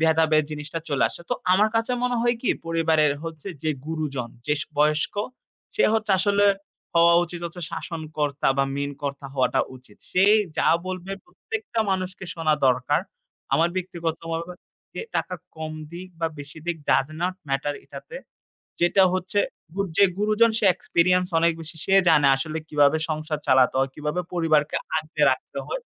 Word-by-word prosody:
ভেদাভেদ 160 -1 +4
জিনিসটা 150 +2 -5
চলে 140 - +2
আসে। - - -11
তো - - +3 0.2
আমার 205 +4 +5
কাছে 225 +2 +1
মনে 250 0 +1
হয় 240 0 +2
কি, 250 - +2 0.2
পরিবারের 160 -3 +3
হচ্ছে 165 +2 -7 0.2
যে 155 - +2 0.2
গুরুজন, 145 -7 -3 0.2
যে - - +2
স - - -5
বয়স্ক 150 +1 +2 0.6
সে 430 - +3
হচ্ছে 215 -1 0
আসলে 205 0 +3 0.5
হওয়া 170 0 +6
উচিত 175 0 -8
হচ্ছে 175 +1 -9
শাসনকর্তা 155 -5 -2
বা 135 - +4
মেইন 140 0 -2
কর্তা 140 -1 -4
হওয়াটা 130 -2 +2 0.2
উচিত। 130 0 -19
সেই 195 +3 +6 0.2
যা - - +3 0.2
বলবে 185 +1 -4
প্রত্যেকটা 225 +1 -4
মানুষকে 185 0 -2
শোনা 160 -2 +2
দরকার। 125 -1 +2 0.5
আমার 165 +1 +3
ব্যক্তিগতভাবে 165 -1 -3 0.4
যে - - -4
টাকা 180 - -2 0.2
কম 155 0 -5 0.2
দিক 180 +2 -8
বা 165 - +2
বেশি 145 +2 -9
দিক 175 -1 -1
ডাজ 135 - +4
নট 180 +1 0
ম্যাটার 140 +2 -1
এটাতে। 475 - -9 0.7
যেটা 185 +3 +5
হচ্ছে, 185 +2 0 0.4
গউ 200 - +1
যে 200 - +8
গুরুজন 215 +2 +4
সে - - +1
এক্সপিরিয়েন্স 180 +1 +2
অনেক 170 +1 +4
বেশি। 160 +1 -10
সে 195 - +1 0.2
জানে 150 -3 +5
আসলে 155 +3 -3
কিভাবে 145 0 +4
সংসার 155 0 -2
চালাতে 130 0 +5
হয়, 135 0 +1
কিভাবে 150 +4 -2
পরিবারকে 155 -3 +2 0.2
আঁকড়ে 155 0 -1
রাখতে - - -4
হয়। - - -3
165 Hz, 160 wpm, -24 LUFS, 150-185 Hz, 0.7 s, যে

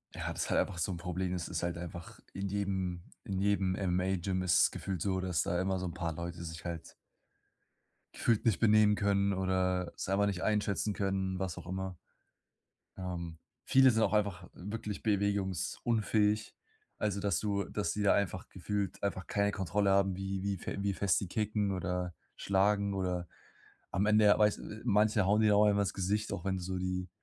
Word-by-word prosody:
Ja, - - -3
das - - -2
ist - - -7
halt - - +3
einfach 90 - -4
so 85 - -1
'n - - -5
Problem. 90 +1 -3
Es 90 -1 -3
ist 85 -2 -3
halt 85 -1 -1
einfach 85 0 -8
in 100 +1 -3
jedem 95 -3 -2 0.2
in 95 -1 -2
jedem 100 -2 +2
MMA-Gym 95 0 0
ist 90 -2 +3
es - - +4
gefühlt 95 -4 -4
so, 95 -1 0
dass 90 -2 0
da 90 0 0
immer 95 0 0
so 95 - -3
'n 85 - -4
paar 85 -2 -3
Leute 85 +1 -6
sich 80 -1 -7
halt 85 -2 -6 1.2
gefühlt 115 -3 +1
nicht 110 -7 +3
benehmen 105 -1 +5
können 100 -1 +2
oder 95 -1 0
selber 100 +2 +1
nicht 95 -3 -2
einschätzen 105 -1 0
können, 95 -2 -1
was 95 -3 -3
auch - - -9
immer. 95 0 -4 1.0
Ähm, 85 -3 -5 0.3
viele 130 -1 +6
sind 110 -1 +2
auch 100 - +2
einfach 100 -4 0
wirklich 105 +2 -5
bewegungsunfähig. 105 +1 0 0.4
Also, 100 -2 -1
dass 100 -3 +1
du 100 -2 0
dass 105 +3 -2
die 105 - -2
da 100 - +5
einfach 95 -2 -1
gefühlt 100 0 -3
einfach 95 -2 -2
keine 100 0 +1
Kontrolle 100 +1 0
haben, 95 -1 +3
wie 95 0 -3
wie 100 0 -1
fe - - -5
wie 100 0 0
fest 95 +1 +2
die 100 - -4
kicken 105 0 0
oder 90 -1 -2 0.2
schlagen 100 +1 +2
oder 90 -2 -2 0.6
am 100 +2 +1
Ende, 105 0 +5
ja, 105 - +6
weißt 105 -1 +3 0.2
manche 105 -2 +3
hauen 105 +3 +3
dir 110 - +5
da 105 +1 +5
einfach 100 -1 +4
ins 100 - -1
Gesicht, 105 +3 -1
auch 100 -3 -5
wenn 95 -1 0
du 90 - -6
so 95 +1 -3
die 90 -1 -2
95 Hz, 190 wpm, -32 LUFS, 90-100 Hz, 1.2 s, viele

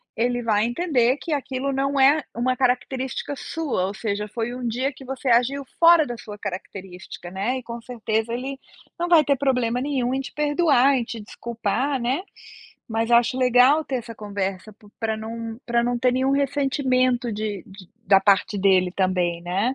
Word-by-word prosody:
ele 245 +1 0
vai 215 -1 +2
entender 255 -1 +1
que 325 - -4
aquilo 275 -1 -2
não 275 +1 0
é 285 +3 +5
uma 255 +2 0
característica 255 +2 -1
sua, 275 - -2
ou 200 - -6
seja, 210 -1 -3
foi 230 +3 -4
um 245 -1 -4
dia 260 +5 -1
que 265 - -13
você 265 +1 -6
agiu 260 +4 +2
fora 335 -2 +7
da 240 - -5
sua 210 -2 -10
característica, 185 -2 -8
né, 205 +7 -1
e 255 - -7
com 235 0 -7
certeza 225 -2 -2
ele 265 +3 -4 0.4
não 345 - 0
vai 330 -3 +6
ter 280 - +3
problema 250 -3 0
nenhum 260 -3 -1
em 265 - -1
te 270 - -8
perdoar, 290 -3 +3
em 250 - 0
te 230 0 -7
desculpar, 235 +5 -2
né. 255 +7 -1 0.7
Mas 225 +1 -1
acho 240 +2 +4
legal 255 +4 +4
ter 270 - -2
essa 235 -1 -7
conversa 200 -1 -4
p 210 +1 -21
pra 220 -1 -1
não 225 +1 -6
pra 235 0 +1
não 245 0 0
ter 250 +1 +3
nenhum 260 +1 +1
ressentimento 265 -3 +1
de 210 -3 -4
de 195 -2 -13 0.2
da 195 0 +6
parte 200 +1 +2
dele 190 -2 +3
também, 180 -2 0
né. 195 +9 -1
245 Hz, 180 wpm, -23 LUFS, 215-270 Hz, 0.7 s, fora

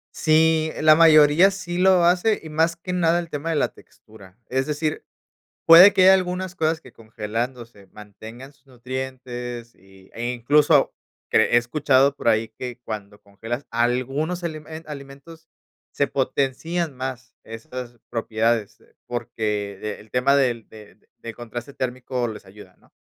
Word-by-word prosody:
Sí, 160 0 +2
la 155 0 +7
mayoría 155 +3 +6
sí 185 -2 -6
lo 185 -1 +4
hace 180 +5 +2
y 160 - -10
más 160 +2 +1
que 180 +2 -6
nada 170 -1 +2
el 170 -1 -6
tema 150 +2 -4
de 165 - 0
la 145 - +1
textura. 100 -3 -19
Es 130 +1 0
decir, 155 +1 -3 0.6
puede 175 +5 +9
que 185 - +3
haya 190 +1 +8
algunas 185 0 -2
cosas 160 -2 -1
que - - -16
congelándose, 115 0 -6
mantengan 110 +6 -12
sus 140 -1 -34
nutrientes 125 -2 -7
y 95 0 -21
eh, 120 +2 -3
incluso 145 +4 +3 0.4
que - - +4
he 120 - +2
escuchado 135 +2 +2
por 125 - -2
ahí 110 0 +2
que 125 +2 -8
cuando 105 -2 -7
congelas 115 +6 -7
algunos 130 +9 -1
elemen 160 -1 -7
alimentos 150 +3 -11 0.4
se 140 - 0
potencian 140 +5 -2
más 130 0 -7
estas 120 +2 -9
propiedades, 115 -1 -1 0.3
porque, 105 -4 -4
el 110 - -17
tema 135 +3 +3
de 125 -4 +1
de 105 -1 -15 0.2
del 115 -1 -8
contraste 120 +3 -8
térmico 125 -1 -3
les 105 -2 -9
ayuda, 95 -1 -15
¿no?, - - -28
130 Hz, 150 wpm, -22 LUFS, 115-160 Hz, 0.6 s, puede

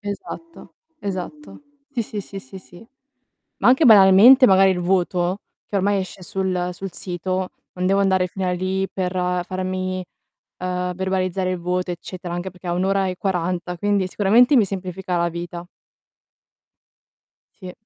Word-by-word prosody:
esatto, 215 +11 -8 0.3
esatto. 200 +11 -6 0.3
Sì, 245 -5 -2
sì, 210 -1 -6
sì, 195 0 -9
sì, 130 +9 -11
sì. 185 +3 -16 0.7
Ma - - +1
anche 260 +5 +4
banalmente 215 +4 +8
magari 190 -3 +5
il 180 - -2
voto, 180 0 0 0.3
che - - -5
ormai 200 +1 +2
esce 185 0 -7
sul 185 -1 -2
sul 190 +1 -7
sito, 185 +1 -3 0.2
non 180 0 -3
devo 195 +1 +3
andare 190 -2 +2
fino 190 +1 -4
a - - +1
lì 185 +2 -1
per 185 -2 -2 0.3
farmi, 185 0 -3 0.6
uhm, 180 0 -2
verbalizzare 185 0 -1
il 185 - -2
voto 180 +1 -2
eccetera, 175 0 -7
anche 175 +2 -4
perché 180 0 -12
è 175 - -1
1 180 +1 0
ora 195 0 +1
e 185 - -3
40, 180 -1 -2
quindi 205 -1 0
sicuramente 225 +9 +4
mi 225 -6 +5
semplifica 185 -1 -4
la 170 0 +1
vita. 170 +1 -7 1.9
Sì. 185 -2 -8
185 Hz, 155 wpm, -21 LUFS, 180-195 Hz, 1.9 s, banalmente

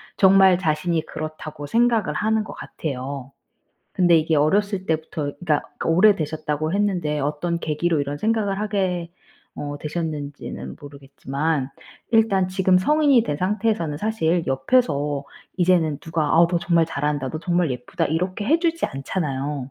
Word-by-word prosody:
정말 190 -1 +6
자신이 165 -1 0
그렇다고 155 -2 -7
생각을 230 -5 +2
하는 220 +5 +1
것 - - -8
같아요. 135 -2 -6 0.6
근데 175 -2 +5
이게 160 0 +2
어렸을 190 +6 +1
때부터 155 -2 -2
그니까 155 -5 0 0.2
그 - - -2
오래되셨다고 155 -4 +2
했는데 185 -7 0
어떤 150 +4 -1
계기로 160 0 0
이런 140 0 -3
생각을 210 +2 0
하게 190 -5 -1 0.4
어 145 0 -5
되셨는지는 150 -2 -5
모르겠지만 140 0 -3 0.4
일단 220 -5 +3
지금 185 0 +3
성인이 285 +3 +4
된 145 - -2
상태에서는 185 -4 -1
사실 175 -5 0
옆에서 145 - +1 0.3
이제는 170 -5 +2
누가 160 +1 -2
"아 170 - +7
너 175 0 +1
정말 170 -1 +2
잘한다.", 145 -3 -2
"너 155 - -5
정말 175 -1 0
예쁘다." 125 -1 -2
이렇게 185 +6 -2
해주지 335 +3 +2
않잖아요. 135 -2 -3
165 Hz, 335 characters per minute, -22 LUFS, 145-190 Hz, 0.6 s, 아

